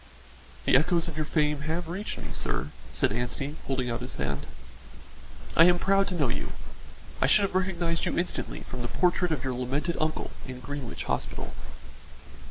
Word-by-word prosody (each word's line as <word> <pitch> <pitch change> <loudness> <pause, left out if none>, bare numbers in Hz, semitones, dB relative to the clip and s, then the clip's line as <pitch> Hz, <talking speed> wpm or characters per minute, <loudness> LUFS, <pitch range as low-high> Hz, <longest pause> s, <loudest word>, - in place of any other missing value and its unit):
"The - - +5
echoes 165 +5 +4
of 165 - -5
your 155 -1 -1
fame 150 -2 +2
have 160 +3 -2
reached 190 +5 -3
me, - - -6
sir," 70 - -1 0.2
said - - +2
Anstey, 125 +6 -2
holding 130 -2 0
out 115 0 -2
his 125 - -5
hand. 70 0 -2 1.1
"I 165 - +9
am 175 0 +6
proud 195 +2 +3
to 190 - -2
know 150 -6 +2
you. 120 - -2 0.7
I - - +5
should 205 - +6
have 195 - 0
recognised 175 -3 +1
you - - -1
instantly 175 +1 -1
from 125 - -6
the 120 - -1
portrait 180 +5 +2
of 145 -4 0
your 130 -1 -1
lamented 135 +7 -1
uncle 155 0 -1 0.2
in 130 -1 -6
Greenwich 140 -2 -5
Hospital." - - -2
155 Hz, 175 wpm, -28 LUFS, 130-175 Hz, 1.1 s, I